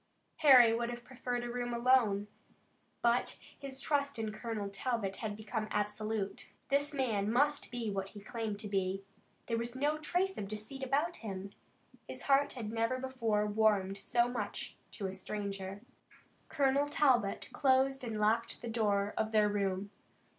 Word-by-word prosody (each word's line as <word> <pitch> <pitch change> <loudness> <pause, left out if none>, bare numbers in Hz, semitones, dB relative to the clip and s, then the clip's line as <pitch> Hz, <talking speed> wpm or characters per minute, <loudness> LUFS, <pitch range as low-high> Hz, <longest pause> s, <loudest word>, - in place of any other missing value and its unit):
Harry 255 -6 +8
would 235 +1 -1
have 240 0 -6
preferred 245 -1 -3
a - - -3
room 240 0 -2
alone, 235 -5 +3 0.8
but 235 +1 +2 0.2
his 270 -1 -5
trust 280 -1 0
in 220 -1 -2
Colonel 215 -2 -4
Talbot 200 -1 -2
had 220 - -3
already 215 +1 -10
become 215 0 -2
absolute. 210 -1 -2 0.2
This 285 +1 +2
man 220 -7 0
must 285 +4 +2
be 235 -3 -3
what 195 -1 -3
he 205 - -10
claimed 220 0 -4
to 215 - -4
be. 195 -1 -1 0.4
There 230 -1 -1
was 235 +1 -3
no 295 +3 +1
trace 365 +5 0
of 200 - -4
deceit 215 +6 -6
about 285 +6 0
him. 195 -3 -6 0.6
His - - -6
heart 280 0 +3
had 225 -5 -5
never 230 +3 0
before 235 -5 0
warmed 205 -2 +2
so 240 +4 +2
much 230 -5 -4 0.2
to 200 - -5
a 190 - -2
stranger. 195 0 -5 0.7
Colonel 280 -1 +2
Talbot 250 -9 +2
closed 270 -1 +3
and 225 -3 -3
locked 225 +2 +1
the 235 - -3
door 205 -3 +1
of 220 0 0
their 210 -1 +4
room. 200 -1 -1
230 Hz, 160 wpm, -33 LUFS, 205-260 Hz, 0.8 s, Harry